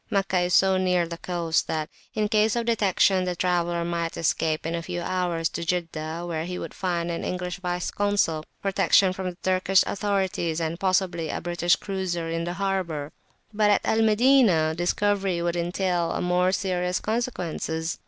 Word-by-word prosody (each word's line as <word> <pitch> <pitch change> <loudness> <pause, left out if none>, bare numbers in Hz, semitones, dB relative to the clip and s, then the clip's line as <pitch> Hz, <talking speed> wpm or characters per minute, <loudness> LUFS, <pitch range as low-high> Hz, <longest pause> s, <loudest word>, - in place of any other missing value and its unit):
Meccah 195 -2 +1
is 175 0 +1
so 190 0 +4
near 180 -2 +2
the 170 0 -7
coast, 170 -2 -1
that, 155 -1 -2 0.3
in 215 -1 +1
case 215 0 +2
of 235 -1 -1
detection, 195 -4 +2
the 180 -1 -2
traveller 175 -1 0
might 170 -1 -2
escape 155 -1 0
in 165 - -2
a 170 - -2
few 175 +1 -4
hours 175 -2 -1
to - - -5
Jeddah, 165 -1 -3
where 165 -2 -3
he 180 +1 -4
would - - -6
find 175 -2 -2
an 170 - -4
English 180 0 -3
Vice 180 -1 -2
Consul, 200 -6 +1 0.2
protection 195 -1 +3
from 185 0 -3
the 175 - -10
Turkish 185 0 +3
authorities, 190 -5 -1
and 165 +1 -3
possibly 185 -4 0
a - - -2
British 175 0 +1
cruiser 185 -4 -3
in 165 0 -2
the 175 - -3
harbour. 180 -6 -2 0.4
But 210 0 +3
at 205 - +2
Al 220 - +2
Madinah 220 -8 +4
discovery 190 +2 0
would 170 0 -1
entail 175 0 -1
more 180 +1 +2
serious 180 -2 -1
consequences. 175 -8 -3
180 Hz, 175 wpm, -25 LUFS, 170-195 Hz, 0.4 s, so